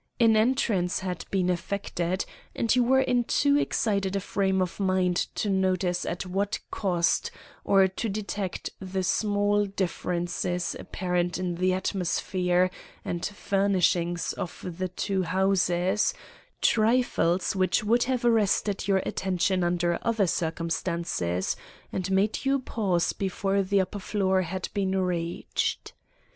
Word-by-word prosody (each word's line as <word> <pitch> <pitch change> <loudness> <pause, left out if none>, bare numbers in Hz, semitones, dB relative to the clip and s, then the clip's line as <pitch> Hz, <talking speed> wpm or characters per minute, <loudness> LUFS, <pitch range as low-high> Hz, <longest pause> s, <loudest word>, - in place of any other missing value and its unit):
An 225 -2 +5
entrance 215 -7 +2
had 180 -2 -4
been 185 -2 +1
effected, 180 0 -2 0.3
and 230 +1 +2
you 250 - +4
were 265 +2 +4
in 250 -2 +2
too 285 +4 +3
excited 200 -8 0
a - - +1
frame 190 -1 0
of 185 0 -2
mind 185 -2 +2 0.2
to - - -1
notice 185 -2 +1
at 175 +2 -3
what 195 +2 -1
cost, 175 -4 +1 0.3
or 195 -1 +5
to 205 +4 -4
detect 200 -2 -4
the 190 0 -3
small 205 +1 +2
differences 180 -2 -2
apparent 180 -1 -1
in 180 -1 -2
the 185 +2 +1
atmosphere 185 -1 0 0.3
and 170 0 -3
furnishings 185 -4 +1
of 175 - -6
the 185 - 0
two 190 +2 -1
houses—trifles 190 - +1
which 185 +1 +2
would 235 +3 +3
have 250 -1 -1
arrested 210 -3 +2
your 195 -2 +2
attention 185 0 0
under 175 0 +1
other 225 -4 +1
circumstances, 165 - -1 0.4
and 185 0 -2
made 195 +3 +2
you 275 0 +2
pause 200 -9 0
before 195 +1 0
the 195 +1 +2
upper 190 +2 -2
floor 190 -1 +1
had 185 +1 -3
been 190 -1 0
reached. 175 -2 -2
190 Hz, 130 wpm, -27 LUFS, 180-205 Hz, 0.4 s, An